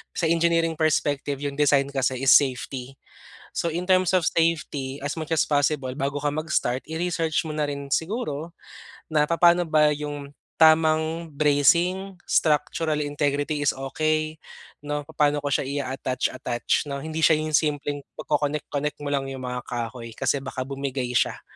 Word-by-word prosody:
Sa -, -, -3 dB
engineering 165 Hz, -1 st, +2 dB
perspective 145 Hz, -3 st, 0 dB
yung 140 Hz, 0 st, -4 dB
design 140 Hz, -1 st, +4 dB
kasi 130 Hz, -1 st, -1 dB
is 135 Hz, -, +5 dB
safety. 130 Hz, -1 st, +2 dB, 0.6 s
So, -, -, 0 dB
in 175 Hz, +3 st, -3 dB
terms 185 Hz, -1 st, +4 dB
of 180 Hz, -, +3 dB
safety, 145 Hz, -4 st, 0 dB
as 145 Hz, -, -2 dB
much 155 Hz, 0 st, -6 dB
as 160 Hz, -, +3 dB
possible, 145 Hz, -2 st, +1 dB
bago 140 Hz, 0 st, -2 dB
ka 145 Hz, -, -1 dB
mag-start 155 Hz, -4 st, -1 dB
i-research 165 Hz, +1 st, -1 dB
mo 155 Hz, -, -5 dB
na 155 Hz, -, 0 dB
rin 140 Hz, -1 st, -5 dB
siguro 165 Hz, -, -3 dB, 0.6 s
na 150 Hz, -2 st, +3 dB
papaano 170 Hz, +2 st, +4 dB
ba 155 Hz, -2 st, +4 dB
'yung 145 Hz, -1 st, -6 dB, 0.2 s
tamang 160 Hz, +1 st, +4 dB
bracing, 170 Hz, +7 st, +2 dB
structural 155 Hz, 0 st, +1 dB
integrity 145 Hz, +1 st, -1 dB
is -, -, +3 dB
okey, 155 Hz, +3 st, -1 dB, 0.5 s
'no, 145 Hz, 0 st, -2 dB
papaano 145 Hz, -1 st, +1 dB
ko 145 Hz, -, -1 dB
siya 135 Hz, -, +1 dB, 0.2 s
i-attach, 130 Hz, -1 st, -2 dB
attach 120 Hz, +3 st, -1 dB
'no. 140 Hz, -1 st, -4 dB
Hindi 160 Hz, 0 st, -4 dB
siya 160 Hz, 0 st, +6 dB
'yung 155 Hz, 0 st, -3 dB
simpleng 145 Hz, -2 st, -1 dB, 0.2 s
pag-connect 150 Hz, 0 st, -1 dB
connect 150 Hz, +1 st, -2 dB
mo 145 Hz, -, -3 dB
lang 135 Hz, -1 st, -1 dB
'yung 135 Hz, -1 st, -6 dB
mga 125 Hz, 0 st, -4 dB
kahoy 115 Hz, -1 st, -5 dB
kasi 135 Hz, +3 st, 0 dB
baka 130 Hz, -1 st, -5 dB
bumigay 135 Hz, -1 st, -3 dB
siya. -, -, +1 dB
145 Hz, 160 wpm, -24 LUFS, 140-160 Hz, 0.6 s, siya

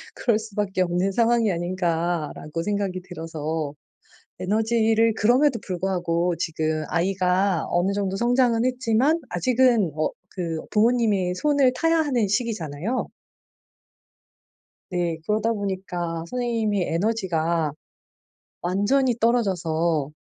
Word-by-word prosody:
'그럴 230 Hz, -4 st, +1 dB
수밖에 205 Hz, -3 st, -2 dB
없는 180 Hz, +2 st, +1 dB
상황이 230 Hz, 0 st, +2 dB
아닌가.'라고 170 Hz, -3 st, -2 dB
생각이 200 Hz, -2 st, -2 dB
들어서 160 Hz, -4 st, -4 dB, 0.7 s
에너지를 225 Hz, +2 st, +2 dB
그럼에도 245 Hz, +3 st, +3 dB
불구하고 175 Hz, -2 st, -1 dB
지금 155 Hz, -1 st, -2 dB
아이가 185 Hz, 0 st, +1 dB
어느 175 Hz, +3 st, +1 dB
정도 200 Hz, -1 st, -1 dB
성장은 240 Hz, 0 st, +2 dB
했지만 255 Hz, +5 st, +2 dB
아직은 245 Hz, -, +2 dB
어 155 Hz, -, 0 dB, 0.3 s
그 165 Hz, -3 st, -2 dB
부모님의 210 Hz, -5 st, +2 dB
손을 280 Hz, -2 st, +3 dB
타야 330 Hz, 0 st, +2 dB
하는 255 Hz, -8 st, +1 dB
시기잖아요. 205 Hz, -, -2 dB, 1.8 s
네. 175 Hz, -3 st, -1 dB
그러다 215 Hz, +3 st, +1 dB
보니까 180 Hz, -5 st, -3 dB
선생님이 225 Hz, -6 st, 0 dB
에너지가 170 Hz, -5 st, 0 dB, 0.9 s
완전히 215 Hz, +9 st, +2 dB
떨어져서 170 Hz, -, +1 dB
195 Hz, 265 characters per minute, -24 LUFS, 170-230 Hz, 1.8 s, 그럼에도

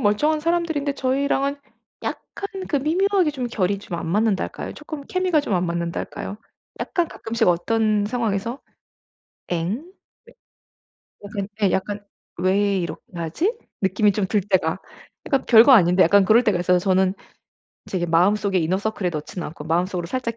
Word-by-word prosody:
멀쩡한 295 Hz, +8 st, +2 dB
사람들인데 320 Hz, -4 st, 0 dB
저희랑은 275 Hz, +1 st, 0 dB, 0.5 s
약간 395 Hz, -, -5 dB, 0.2 s
그 295 Hz, -, +1 dB
미묘하게 355 Hz, +4 st, +2 dB
좀 260 Hz, -4 st, -4 dB
결이 200 Hz, -4 st, 0 dB
좀 175 Hz, -4 st, -6 dB
안 -, -, -5 dB
맞는다 205 Hz, +2 st, +1 dB
할까요? -, -, -6 dB
쪼끔 300 Hz, -1 st, -8 dB
케미가 365 Hz, -1 st, +1 dB
좀 210 Hz, -, -2 dB
안 175 Hz, 0 st, +1 dB
맞는다 170 Hz, 0 st, -2 dB
할까요? 200 Hz, -, -6 dB, 0.4 s
약간 345 Hz, -2 st, -1 dB
가끔씩 225 Hz, -2 st, -2 dB
어떤 210 Hz, +4 st, +2 dB
상황에서? 230 Hz, +1 st, -2 dB, 0.9 s
'엥?' 180 Hz, -, -2 dB, 1.4 s
네. 205 Hz, -, -10 dB
약간 200 Hz, -2 st, -3 dB, 0.2 s
예 195 Hz, -, +4 dB
약간 205 Hz, +3 st, -2 dB, 0.3 s
'왜 195 Hz, +2 st, +2 dB
이렇게 170 Hz, -2 st, -4 dB
하지?' 170 Hz, -, -1 dB, 0.3 s
느낌이 205 Hz, +2 st, +3 dB
좀 200 Hz, -1 st, -1 dB
들 205 Hz, +2 st, +1 dB
때가 185 Hz, -3 st, 0 dB, 0.5 s
그러니까 275 Hz, -3 st, 0 dB
별거 235 Hz, +3 st, +8 dB
아닌데 180 Hz, -4 st, +6 dB
약간 200 Hz, +3 st, +5 dB
그럴 225 Hz, +5 st, +5 dB
때가 210 Hz, -6 st, +2 dB
있어서 180 Hz, 0 st, +3 dB
저는 190 Hz, 0 st, +2 dB, 0.7 s
제게 175 Hz, -2 st, -2 dB
마음속에 190 Hz, +3 st, +2 dB
이너서클에 185 Hz, +3 st, -1 dB
넣지는 155 Hz, +3 st, -5 dB
않고 150 Hz, -1 st, -10 dB
마음속으로 175 Hz, +2 st, -1 dB
살짝 230 Hz, +2 st, -3 dB
205 Hz, 345 characters per minute, -22 LUFS, 180-260 Hz, 1.4 s, 별거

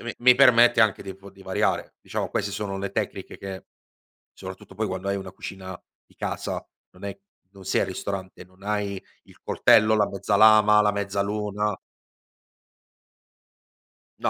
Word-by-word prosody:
mi 115 Hz, 0 st, -5 dB
mi 125 Hz, +1 st, +6 dB
permette 120 Hz, -2 st, +6 dB
anche 110 Hz, -3 st, +1 dB
di 95 Hz, -1 st, -7 dB
po 100 Hz, +1 st, -14 dB
di 95 Hz, 0 st, -17 dB
variare. 95 Hz, 0 st, -1 dB
Diciamo -, -, -4 dB
queste 100 Hz, -, -2 dB
sono 100 Hz, -1 st, -4 dB
le 100 Hz, 0 st, -4 dB
tecniche 100 Hz, -3 st, -4 dB
che 95 Hz, -2 st, -7 dB, 0.7 s
soprattutto -, -, -10 dB
poi, 110 Hz, 0 st, -2 dB
quando 95 Hz, +1 st, -4 dB
hai 100 Hz, -, 0 dB
una 95 Hz, -1 st, -7 dB
cucina 95 Hz, -1 st, -8 dB, 0.2 s
di -, -, -27 dB
casa, -, -, -4 dB, 0.3 s
non -, -, -14 dB
è 100 Hz, -1 st, -5 dB, 0.3 s
non 100 Hz, -1 st, -15 dB
sei 95 Hz, -, +1 dB
al -, -, -1 dB
ristorante, 95 Hz, -1 st, -6 dB
non 95 Hz, +1 st, -24 dB
hai 100 Hz, -1 st, -2 dB, 0.2 s
il -, -, -21 dB
coltello, 110 Hz, 0 st, +4 dB
la 105 Hz, -1 st, +3 dB
mezza 100 Hz, +1 st, -1 dB
lama, 105 Hz, 0 st, +7 dB
la 105 Hz, 0 st, +2 dB
mezzaluna. 100 Hz, +1 st, -2 dB, 2.5 s
No -, -, 0 dB
100 Hz, 160 wpm, -25 LUFS, 95-105 Hz, 2.5 s, lama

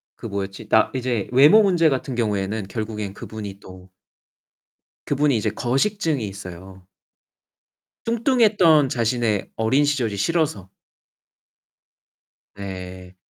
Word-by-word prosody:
그 -, -, -8 dB
뭐였지? 100 Hz, -2 st, -6 dB
나 -, -, +4 dB
이제 125 Hz, -5 st, -2 dB
외모 145 Hz, -, +7 dB
문제 175 Hz, -5 st, +3 dB
같은 135 Hz, -1 st, -2 dB
경우에는 105 Hz, -3 st, -2 dB
결국에는 105 Hz, -1 st, -5 dB
그분이 105 Hz, -3 st, -8 dB
또 95 Hz, -1 st, -14 dB, 1.1 s
그분이 145 Hz, -2 st, +1 dB
이제 110 Hz, -, -1 dB
거식증이 140 Hz, -, -1 dB
있어요. 95 Hz, -1 st, -10 dB, 1.2 s
뚱뚱했던 215 Hz, -, +3 dB
자신의 115 Hz, -3 st, -1 dB
어린 130 Hz, +6 st, +2 dB
시절이 120 Hz, -8 st, -1 dB
싫어서. 155 Hz, -, -1 dB, 1.8 s
네. 95 Hz, -2 st, -8 dB
115 Hz, 240 characters per minute, -22 LUFS, 100-145 Hz, 1.8 s, 외모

